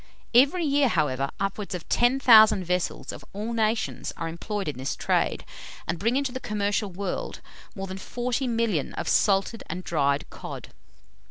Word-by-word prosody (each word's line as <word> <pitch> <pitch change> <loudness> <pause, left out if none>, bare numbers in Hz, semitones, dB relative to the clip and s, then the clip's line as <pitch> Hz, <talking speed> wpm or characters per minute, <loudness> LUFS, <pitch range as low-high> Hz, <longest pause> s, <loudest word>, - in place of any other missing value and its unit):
Every 285 +8 +5
year, 285 -1 +3
however, 140 - 0
upwards 195 0 -3
of 175 - -7
10,000 235 -5 +6
vessels, 180 0 -2
of - - -10
all 215 +4 -4
nations, 220 0 -1
are 165 - -3
employed 195 +4 -4
in 145 -4 -4
this 130 - -2
trade, - - 0 0.4
and 170 0 -2
bring 230 +6 +1
into 275 -1 0
the 260 - -5
commercial 205 -2 -1
world 195 +2 -4 0.4
more 195 -2 -4
than 190 0 -7
40,000,000 230 - -1
of - - -4
salted 200 +2 +2
and 180 +3 -5
dried 140 -4 0
cod. - - -8
205 Hz, 155 wpm, -26 LUFS, 180-235 Hz, 0.4 s, 10,000